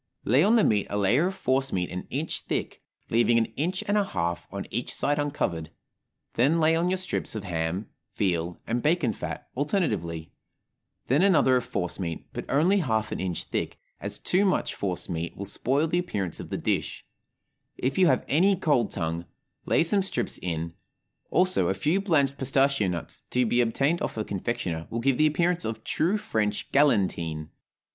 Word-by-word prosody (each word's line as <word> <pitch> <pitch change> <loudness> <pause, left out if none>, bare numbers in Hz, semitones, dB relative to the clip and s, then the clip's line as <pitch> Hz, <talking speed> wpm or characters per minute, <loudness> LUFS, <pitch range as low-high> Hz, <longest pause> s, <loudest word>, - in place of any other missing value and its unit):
Lay 130 +8 +4
on 215 +4 +5
the 225 - +5
meat 105 -2 +2
a 105 - -2
layer 120 - +3
of 190 - -4
force 135 -6 0
meat 90 -2 -1
an 90 - -5
inch - - -3
thick, - - -3 0.3
leaving 120 0 +4
an 115 - +3
inch 180 +6 -1
and 205 +1 +3
a - - +3
half 85 - -2
on 100 0 -5
each 120 - -2
side 145 +1 0
uncovered; 90 - -2 0.6
then 140 +8 +3
lay 160 0 +4
on 170 +2 +1
your 185 - +1
strips 185 -9 -2
of 110 - -4
ham, 85 +2 -2 0.3
veal, 85 -3 -1
and 120 +2 -1
bacon 150 -6 +2
fat, - - -6
alternately; 105 - -1 0.7
then 140 +6 +3
another 180 -9 +5
of 125 - -2
force 90 -1 -2
meat, 85 -3 -4
but - - -5
only 170 +9 +3
half 110 - 0
an - - -3
inch 90 -3 -2
thick, - - -3 0.2
as - - -3
too 185 +3 +1
much 190 -2 +1
force 95 -3 -3
meat 85 -1 -4
will 100 - -4
spoil 135 +9 0
the 170 +2 +1
appearance 100 - -3
of - - -7
the - - -2
dish; - - -2 0.7
if 135 +7 -1
you 185 - +6
have 130 - +2
any 190 +7 +4
cold 145 - +2
tongue, 85 -1 -3 0.4
lay - - +4
some 195 +4 +3
strips 190 - -2
in, 85 -1 -3 0.6
also 185 - +3
a 95 - +1
few 155 - +1
blanched 140 -8 +2
pistachio 135 -4 +2
nuts 85 -2 -5
(to 125 0 +2
be 120 +2 +3
obtained 140 +8 +1
of - - -3
a 110 - 0
confectioner) 90 -5 -3
will 115 - -3
give 130 +1 +1
the 155 - +6
appearance 175 +3 +1
of 110 0 -4
true 180 +7 +1
French 110 - -2
galantine. 85 - +2
125 Hz, 185 wpm, -27 LUFS, -, 0.7 s, you